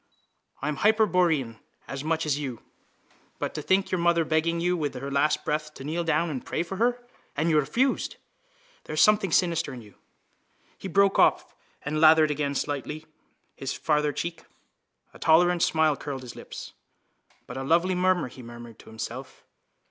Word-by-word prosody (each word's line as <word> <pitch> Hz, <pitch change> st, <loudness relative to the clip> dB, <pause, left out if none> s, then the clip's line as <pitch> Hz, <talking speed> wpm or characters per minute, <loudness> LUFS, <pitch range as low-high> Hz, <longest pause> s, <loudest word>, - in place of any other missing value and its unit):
I'm 150 Hz, 0 st, -1 dB
hyperborean 175 Hz, -, +2 dB, 0.3 s
as 140 Hz, 0 st, -5 dB
much 160 Hz, +1 st, 0 dB
as 150 Hz, -1 st, 0 dB
you. 130 Hz, -6 st, -5 dB, 0.7 s
But -, -, -3 dB
to 150 Hz, -, -4 dB
think 190 Hz, +5 st, +2 dB
of -, -, -14 dB
your 185 Hz, -, 0 dB
mother 170 Hz, -1 st, +3 dB
begging 165 Hz, +2 st, +1 dB
you 180 Hz, +1 st, +1 dB
with 150 Hz, -5 st, -3 dB
her 140 Hz, +2 st, -5 dB
last 140 Hz, +2 st, +1 dB
breath 150 Hz, 0 st, -2 dB
to -, -, -9 dB
kneel 160 Hz, +4 st, -2 dB
down 165 Hz, 0 st, +1 dB
and 130 Hz, -4 st, -5 dB
pray 165 Hz, -, -2 dB
for 190 Hz, +3 st, -6 dB
her. 245 Hz, +2 st, 0 dB, 0.3 s
And 160 Hz, +3 st, +1 dB
you 155 Hz, -, +5 dB
refused. 240 Hz, -, 0 dB, 0.7 s
There 155 Hz, -, -5 dB
is -, -, +3 dB
something 210 Hz, -4 st, +4 dB
sinister 165 Hz, -5 st, +1 dB
in 120 Hz, -, -10 dB
you.... 105 Hz, -, -17 dB, 0.8 s
He -, -, -8 dB
broke 195 Hz, +2 st, +3 dB
off -, -, +3 dB, 0.3 s
and 155 Hz, +1 st, -2 dB
lathered 155 Hz, -1 st, +6 dB
again 140 Hz, -1 st, -2 dB
lightly 150 Hz, +2 st, -5 dB, 0.5 s
his 135 Hz, 0 st, -4 dB
farther 150 Hz, -1 st, +1 dB
cheek. 170 Hz, +2 st, -5 dB, 0.7 s
A -, -, -14 dB
tolerant 175 Hz, +2 st, +4 dB
smile 155 Hz, -3 st, +3 dB
curled 135 Hz, -2 st, -6 dB
his 125 Hz, -, -9 dB
lips. -, -, -9 dB, 0.7 s
—But -, -, -8 dB
a 135 Hz, -, -3 dB
lovely 170 Hz, +6 st, +2 dB
mummer! 185 Hz, -3 st, +2 dB
he 130 Hz, +1 st, -12 dB
murmured 120 Hz, -1 st, -11 dB
to -, -, -14 dB
himself. 115 Hz, +4 st, -7 dB
155 Hz, 175 wpm, -26 LUFS, 140-175 Hz, 0.8 s, lathered